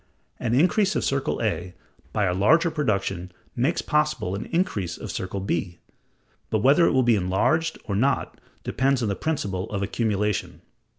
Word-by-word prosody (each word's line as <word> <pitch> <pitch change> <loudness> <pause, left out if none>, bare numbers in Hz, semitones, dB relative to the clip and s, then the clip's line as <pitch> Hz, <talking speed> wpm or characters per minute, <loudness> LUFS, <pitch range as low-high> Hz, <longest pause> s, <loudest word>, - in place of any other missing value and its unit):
An 120 -1 0
increase 190 +7 +3
of - - 0
circle 135 0 0
A 90 -4 -2 0.4
by 105 - +1
a 90 - +1
larger 160 - +4
production 100 - -1 0.2
makes 135 +8 0
possible 150 - 0
an 100 - -4
increase 105 - -1
of - - -6
circle 95 +1 -4
B, 90 -2 -2 0.7
but 110 -1 0
whether 145 +6 +5
it - - +3
will 130 -2 +3
be 120 -1 +4
enlarged 100 - +1
or 100 - -3
not 135 +7 0 0.2
depends 130 -1 +1
on 110 - 0
the 100 - -1
principle 100 -11 -2
of 100 -2 -2
accumulation. 105 -1 -1
110 Hz, 165 wpm, -25 LUFS, 95-145 Hz, 0.7 s, whether